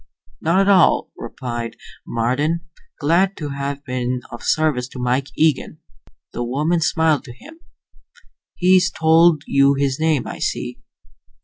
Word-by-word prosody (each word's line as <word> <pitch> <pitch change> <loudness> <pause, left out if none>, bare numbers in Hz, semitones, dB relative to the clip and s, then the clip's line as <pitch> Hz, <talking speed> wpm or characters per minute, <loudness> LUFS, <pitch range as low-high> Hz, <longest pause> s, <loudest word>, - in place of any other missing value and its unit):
"Not 170 +4 +2
at 195 - +1
all," 190 -4 +4
replied 120 -2 -6 0.3
Marden. 135 +8 0 0.4
"Glad 175 +6 +2
to 150 -2 -5
have 140 0 -5
been 125 -1 -2
of 120 - -8
service 150 -6 0
to 130 - -10
Mike 125 +2 0
Eagen." 155 -3 +1 0.6
The 120 - -3
woman 150 +8 0
smiled 160 -2 +1
to 120 - -10
him. 320 - -15 1.0
"He's 185 0 +4
told 160 -1 +4
you 140 0 +3
his 135 0 -1
name, 155 -4 +1
I - - -7
see." - - -3
145 Hz, 135 wpm, -20 LUFS, 125-165 Hz, 1.0 s, all